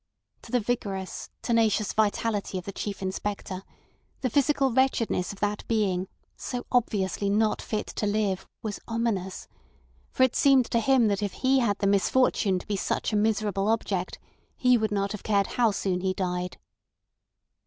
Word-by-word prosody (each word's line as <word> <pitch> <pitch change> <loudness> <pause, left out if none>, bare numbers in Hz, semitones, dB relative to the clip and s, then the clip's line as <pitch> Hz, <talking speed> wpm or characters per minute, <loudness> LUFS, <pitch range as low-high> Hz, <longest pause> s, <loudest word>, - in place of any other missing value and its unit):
To - - -13
the 250 - +3
vigorous, 200 -5 -3
tenacious 225 -3 +2
vitality 210 -2 0
of 180 - -6
the 200 - -4
Chief 200 0 -5
Inspector, 190 0 -3 0.6
the 255 - 0
physical 280 0 +2
wretchedness 235 -7 +1
of 200 - -12
that 210 0 -1
being, 195 -5 +1 0.3
so 245 -1 -5
obviously 205 -5 +1
not 215 +1 +2
fit 215 - -3
to 210 - 0
live, 205 -2 0 0.2
was 210 -2 -4
ominous; 225 -5 -2 0.6
for - - +2
it 260 - +3
seemed 270 -3 +5
to 235 - +3
him 250 -1 +4
that 200 0 0
if 205 -2 -2
he 265 +1 +2
had 210 -5 +1
the 200 - -1
misfortune 200 0 +3
to 180 - -7
be 210 - -2
such 205 - -1
a - - +2
miserable 210 -2 +1
object 200 -5 -1 0.4
he 250 -1 +4
would 220 -2 0
not 200 -1 0
have 210 - -5
cared 200 -2 +2
how 235 +2 +2
soon 190 -3 -1
he 185 0 0
died. 180 -1 -2
210 Hz, 165 wpm, -27 LUFS, 195-230 Hz, 0.6 s, seemed